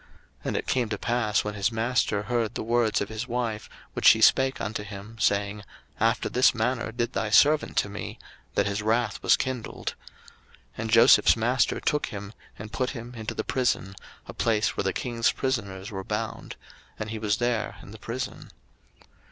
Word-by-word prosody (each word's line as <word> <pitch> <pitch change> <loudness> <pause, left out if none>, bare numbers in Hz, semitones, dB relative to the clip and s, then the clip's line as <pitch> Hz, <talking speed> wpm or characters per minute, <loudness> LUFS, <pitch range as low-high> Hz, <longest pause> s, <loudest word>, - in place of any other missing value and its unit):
01:039:019 - - -26 0.4
And - - -1
it - - -3
came 125 -4 0
to 105 - -2
pass, 110 -2 0
when 105 - -3
his 100 +2 0
master 115 -2 0
heard 115 -1 -1
the - - -3
words 115 -1 +1
of 100 - -3
his 110 +3 -5
wife, 115 -3 -3 0.2
which - - +2
she - - +8
spake 130 0 +4
unto 105 +1 -3
him, 105 +2 -9
saying, 100 0 +1 0.4
After - - +2
this 125 +1 +4
manner 120 +1 -1
did 120 +1 -2
thy 110 - -1
servant 150 +7 +4
to - - +3
me; 100 0 -7 0.4
that 100 - +2
his 100 0 -1
wrath 110 0 0
was - - +4
kindled. 130 -3 -4 0.2
01:039:020 - - -24 0.2
And 110 0 -3
Joseph's 115 +1 +6
master 120 +3 +1
took 150 - 0
him, 100 0 -7 0.2
and 105 +1 -9
put 130 0 0
him 120 -2 -7
into 110 -2 -5
the - - -2
prison, 120 -7 0 0.3
a - - -9
place 110 -2 +1
where - - -1
the 95 - +2
king's 115 +2 0
prisoners 105 -6 -3
were 95 -1 -5
bound: 110 +1 -4 0.4
and 105 0 -5
he 110 - -4
was 105 -1 0
there 120 -2 -1
in - - -12
the 110 - -11
prison. 120 +4 -5
110 Hz, 190 wpm, -26 LUFS, 105-120 Hz, 0.4 s, she